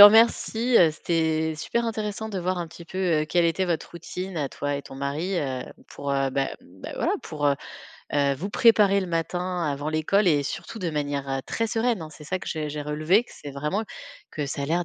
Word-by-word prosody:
remercie, 225 Hz, +3 st, +7 dB
heu. 165 Hz, -3 st, +7 dB
C'était 160 Hz, 0 st, 0 dB
super 235 Hz, +9 st, -1 dB
intéressant 220 Hz, -1 st, -3 dB
de 200 Hz, -3 st, -3 dB
voir 185 Hz, 0 st, -1 dB
un 170 Hz, -, -2 dB
petit 165 Hz, +1 st, -11 dB
peu, 185 Hz, -, -7 dB, 0.2 s
heu, -, -, -1 dB
quelle 170 Hz, +2 st, +3 dB
était 175 Hz, +3 st, +1 dB
votre 170 Hz, -3 st, -2 dB
routine 180 Hz, +2 st, -6 dB
à 145 Hz, -3 st, -1 dB
toi 145 Hz, 0 st, -2 dB
et 140 Hz, -, -5 dB
ton -, -, -11 dB
mari, 150 Hz, +7 st, -1 dB
heu, 130 Hz, -4 st, -2 dB, 0.3 s
pour, 140 Hz, 0 st, -5 dB
heu, 135 Hz, 0 st, +2 dB
bah 135 Hz, +1 st, 0 dB
bah, 95 Hz, +2 st, -10 dB
voilà, -, -, +1 dB
pour, 145 Hz, -1 st, -2 dB
heu 140 Hz, -, +4 dB, 0.6 s
heu, 140 Hz, -1 st, +3 dB
vous 185 Hz, +9 st, -4 dB
préparer 205 Hz, -3 st, +5 dB
le 190 Hz, -, -3 dB
matin 175 Hz, +1 st, -1 dB
avant 145 Hz, 0 st, -1 dB
l'école 160 Hz, +6 st, +3 dB
et 145 Hz, -3 st, +4 dB
surtout 140 Hz, +9 st, -5 dB
de 180 Hz, -5 st, -1 dB
manière, 145 Hz, -2 st, -2 dB
heu, 135 Hz, 0 st, 0 dB
très 230 Hz, -, 0 dB
sereine, 225 Hz, -3 st, 0 dB
hein. 155 Hz, -, -8 dB
C'est 150 Hz, 0 st, -12 dB
ça 185 Hz, +5 st, -1 dB
que -, -, -10 dB
j'ai 155 Hz, -2 st, -2 dB
j'ai 150 Hz, 0 st, -4 dB
relevé, 155 Hz, +9 st, +2 dB
que -, -, -18 dB
c'est 145 Hz, -, -8 dB
vraiment 150 Hz, +10 st, -1 dB, 0.5 s
que 150 Hz, -, -3 dB
ça 140 Hz, 0 st, -3 dB
a -, -, -2 dB
l'air 170 Hz, +3 st, +1 dB
165 Hz, 225 wpm, -26 LUFS, 145-190 Hz, 0.6 s, remercie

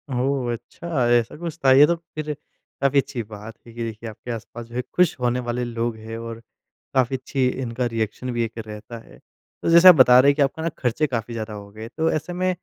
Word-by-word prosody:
ओह! 130 Hz, -1 st, 0 dB
अच्छा 125 Hz, +3 st, -3 dB
ऐसा 120 Hz, -1 st, +2 dB
कुछ 165 Hz, -1 st, -6 dB
था? 135 Hz, -, +7 dB
ये 140 Hz, +3 st, +8 dB
तो 170 Hz, -, +2 dB
फ़िर 155 Hz, -2 st, -6 dB, 0.5 s
काफ़ी 140 Hz, 0 st, +4 dB
अच्छी 130 Hz, -4 st, -3 dB
बात 105 Hz, +1 st, -10 dB
है 115 Hz, -, -12 dB
कि 120 Hz, -, -5 dB
देखिए 115 Hz, 0 st, -6 dB
आपके 110 Hz, +3 st, -8 dB
आस-पास 115 Hz, +1 st, -7 dB
जो 120 Hz, +1 st, -13 dB
है 125 Hz, -, 0 dB
खुश 180 Hz, -3 st, +3 dB
होने 125 Hz, 0 st, 0 dB
वाले 120 Hz, +1 st, -1 dB
लोग 115 Hz, -1 st, -2 dB
हैं 110 Hz, +1 st, -7 dB
और 115 Hz, 0 st, -7 dB, 0.5 s
काफ़ी 130 Hz, 0 st, +2 dB
अच्छी 130 Hz, 0 st, -1 dB
इनका 125 Hz, -1 st, -2 dB
रिएक्शन 115 Hz, +2 st, -3 dB
भी 120 Hz, 0 st, 0 dB
एक 115 Hz, 0 st, -6 dB
रहता 110 Hz, +1 st, -8 dB
है। -, -, -16 dB, 0.5 s
तो -, -, +1 dB
जैसे 170 Hz, +2 st, +8 dB
आप 180 Hz, -, +11 dB
बता 125 Hz, -3 st, +7 dB
रहे 140 Hz, +2 st, +6 dB
हैं 140 Hz, -, -4 dB
कि 150 Hz, -, 0 dB
आपका 140 Hz, +3 st, +1 dB
ना 165 Hz, -, 0 dB
खर्चे 130 Hz, +5 st, 0 dB
काफ़ी 115 Hz, -3 st, -4 dB
ज़्यादा 110 Hz, -1 st, -5 dB
हो 100 Hz, -1 st, -9 dB
गए 110 Hz, +2 st, -8 dB
तो 160 Hz, 0 st, +2 dB
ऐसे 155 Hz, +3 st, -3 dB
में 185 Hz, +1 st, 0 dB
125 Hz, 235 wpm, -23 LUFS, 115-140 Hz, 0.5 s, आप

